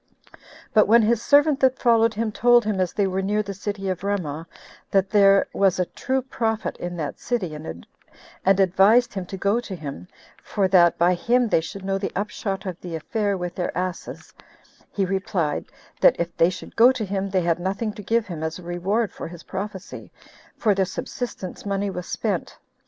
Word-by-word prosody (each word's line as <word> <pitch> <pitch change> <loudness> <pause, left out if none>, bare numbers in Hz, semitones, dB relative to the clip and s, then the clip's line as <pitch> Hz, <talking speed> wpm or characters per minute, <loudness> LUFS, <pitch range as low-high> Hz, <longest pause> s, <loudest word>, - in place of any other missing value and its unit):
But 215 - +5
when 230 +2 +6
his 230 +1 +2
servant 290 +1 +4
that 260 -1 +3
followed 230 -2 +3
him 220 0 -1
told 240 +1 +4
him 210 -3 -1
as 185 -2 +1
they 200 - 0
were 190 0 -1
near 210 +2 0
the 200 -1 -5
city 200 0 -4
of 185 -1 -3
Ramah, 165 -6 -3 0.4
that 195 -1 +1
there 200 -2 +5
was 195 -2 +2
a 180 - +1
true 260 +7 -2
prophet 225 -4 -2
in 175 0 -5
that 150 -3 -4
city, 205 -10 -2
and 150 - -7 0.7
advised 195 +5 +4
him 190 -3 -5
to 195 - -6
go 200 +5 +1
to 220 -5 -6
him, 140 - -8 0.3
for 195 -2 0
that 175 -3 +5
by 175 +2 +4
him 240 +6 +1
they 165 - +3
should 190 +4 -8
know 195 0 0
the 195 - -3
upshot 200 -1 -3
of 180 -2 -6
the 175 -2 -6
affair 200 +4 -1
of 180 0 -4
their 175 -2 -3
asses, 180 -1 -5 0.6
he 195 - 0
replied, 185 -5 -1 0.3
That - - +6
if 170 0 -3
they 165 - +4
should 185 - -9
go 240 +3 +7
to 240 -5 -3
him, 195 0 -2
they 190 -1 +1
had 170 0 +1
nothing 200 +4 -2
to 210 - -9
give 225 +2 +1
him 170 -5 -6
as 160 0 -3
a 180 - -12
reward 190 +6 -1
for - - -7
his 170 0 -11
prophecy, 195 0 -7 0.5
for 215 -3 +3
their 195 -1 +1
subsistence 190 0 -6
money 200 0 -1
was 180 -1 -6
spent. - - -3
195 Hz, 195 wpm, -23 LUFS, 180-215 Hz, 0.7 s, go